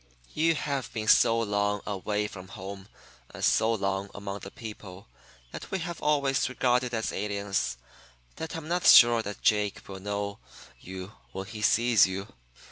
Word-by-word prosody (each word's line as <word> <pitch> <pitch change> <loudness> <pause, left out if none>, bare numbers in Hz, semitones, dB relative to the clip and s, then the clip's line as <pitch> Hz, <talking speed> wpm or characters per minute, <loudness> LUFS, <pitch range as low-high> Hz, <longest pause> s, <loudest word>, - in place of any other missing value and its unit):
"'You 165 +1 +2
have 140 -3 -3
been 110 -2 -4
so 115 +1 +5
long 105 -2 0
away 105 +1 -2
from 95 -2 -10
home 95 +1 -8 0.4
and - - -8
so 110 - +3
long 100 -2 -1
among 100 0 -5
the 100 - -9
people 100 -4 -10 0.4
that - - -8
we 190 - -1
have 170 -1 -5
always 140 -3 +1
regarded 125 -1 +1
as 110 -2 -2
aliens 100 -11 -2 0.6
that 160 - -5
I'm 160 -1 -6
not 175 +1 +1
sure 120 -1 +8
that 105 -1 -7
Jake 105 -2 +1
will 95 -1 -8
know 100 +1 -4 0.4
you 95 +1 -8 0.2
when 95 +1 -5
he 110 +1 -8
sees 115 -1 +4
you. 95 +2 -6
105 Hz, 160 wpm, -28 LUFS, 100-120 Hz, 0.6 s, sure